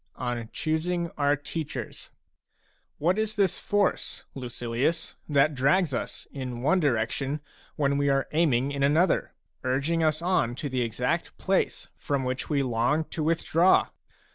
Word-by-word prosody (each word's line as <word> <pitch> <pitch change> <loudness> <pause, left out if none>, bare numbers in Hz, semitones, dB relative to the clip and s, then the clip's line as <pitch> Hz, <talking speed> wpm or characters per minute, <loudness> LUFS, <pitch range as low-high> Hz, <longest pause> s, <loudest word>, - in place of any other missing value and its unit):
LII. - - -5
ON 120 -2 -3
CHOOSING 170 +2 -1
OUR 145 0 +3
TEACHERS 150 +2 -6 0.9
What 180 +7 +1
is 215 0 0
this 195 -5 +2
force, 205 -2 0
Lucilius, 125 +5 -2 0.2
that 145 +1 +4
drags 140 +4 +2
us - - -4
in 125 -3 -5
one 185 +7 +4
direction 135 +1 0 0.4
when 140 -1 +1
we 140 0 +2
are 135 0 +2
aiming 140 -5 +2
in 140 -1 -3
another, 155 +7 +2 0.3
urging 140 +6 +1
us 155 -1 +2
on 170 -9 +1
to 145 +2 -4
the 130 -1 -1
exact 115 -2 -1
place - - 0
from 140 -2 -1
which 130 +1 -3
we 145 -3 +2
long 125 +5 +1
to 160 - -3
with 160 +2 0
draw 175 +4 +4
145 Hz, 150 wpm, -27 LUFS, 130-165 Hz, 0.9 s, that